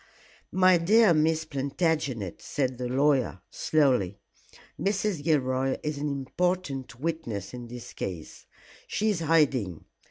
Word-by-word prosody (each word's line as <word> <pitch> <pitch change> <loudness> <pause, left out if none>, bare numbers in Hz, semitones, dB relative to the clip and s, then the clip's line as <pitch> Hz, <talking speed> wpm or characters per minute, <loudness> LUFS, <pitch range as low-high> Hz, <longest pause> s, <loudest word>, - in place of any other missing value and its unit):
"My 185 -1 +5
dear 210 +3 +5
Miss 160 +1 +2
Plantagenet," 140 - -1
said 130 -3 -2
the 125 - -2
lawyer, 135 -6 +2
slowly, 125 - +2 0.6
"Mrs. 195 -5 0
Gilroy 135 -3 +1
is 150 -1 -2
an 150 - -1
important 140 -2 -2
witness 130 - -3
in 120 -1 -7
this 120 0 -9
case. 85 -4 -6 0.4
She 215 +1 +1
is 190 - -2
hiding. 140 - +1
140 Hz, 120 wpm, -27 LUFS, 125-165 Hz, 0.6 s, My